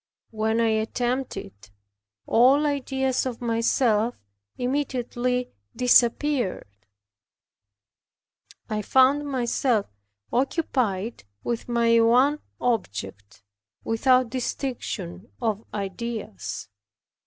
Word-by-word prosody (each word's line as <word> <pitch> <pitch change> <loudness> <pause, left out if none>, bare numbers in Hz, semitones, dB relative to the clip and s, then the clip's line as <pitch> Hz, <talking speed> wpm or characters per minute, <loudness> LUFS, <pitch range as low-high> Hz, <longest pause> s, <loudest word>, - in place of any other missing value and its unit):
When 220 +1 0
I 230 -1 +3
attempted 240 +4 -1
it 100 +2 -17 0.6
all 270 +6 +5
ideas 265 -2 0
of 245 -3 -5
myself 230 -1 +1 0.4
immediately 250 -2 -1 0.2
disappeared. 250 -1 +3 2.0
I 215 -1 -2
found 265 +6 +4
myself 245 -4 +1 0.5
occupied 240 - -1 0.2
with 235 0 -3
my 230 -1 +4
ONE 255 +6 +4 0.2
OBJECT, 100 - -3 0.4
without 255 +2 +3
distinction 230 -7 -4
of 220 -2 -1
ideas. 200 - -5
235 Hz, 75 wpm, -25 LUFS, 220-255 Hz, 2.0 s, all